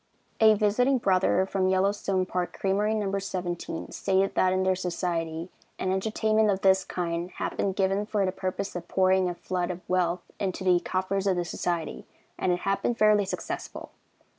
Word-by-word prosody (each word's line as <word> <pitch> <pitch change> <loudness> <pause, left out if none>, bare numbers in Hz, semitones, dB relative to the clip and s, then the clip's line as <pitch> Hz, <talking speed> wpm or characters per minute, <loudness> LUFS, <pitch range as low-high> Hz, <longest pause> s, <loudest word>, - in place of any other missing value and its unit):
A 220 -1 +7
visiting 230 +6 +2
brother 190 -3 +2
from 190 -1 0
Yellowstone 190 0 +1
Park 180 -1 -3
Creamery 205 +3 +1
No. 200 -2 -1
17, 175 -4 -4
stated 195 0 +1
that 185 - +3
in 185 0 +1
their 190 0 +2
society 170 -2 -3 0.3
"an 185 - -1
entertainment 215 +2 +1
of 195 -1 0
this 190 0 +4
kind 170 0 -3
had - - -3
been 195 - 0
given 195 +2 0
for 205 -3 +1
the 185 - 0
purpose 190 +1 -4
of 175 -1 -5
pouring 185 -1 +3
a 175 - -4
flood 180 0 -2
of 180 0 -6
wealth 180 -1 0 0.2
into 190 -1 -2
the 180 -2 +4
coffers 190 +2 -1
of 190 - +3
the 175 0 -1
society, 170 -2 -3 0.3
and 185 - +1
it 180 0 -1
had 195 0 0
been 240 - 0
fairly 215 -2 +4
successful. 190 - -6
190 Hz, 180 wpm, -27 LUFS, 180-200 Hz, 0.3 s, A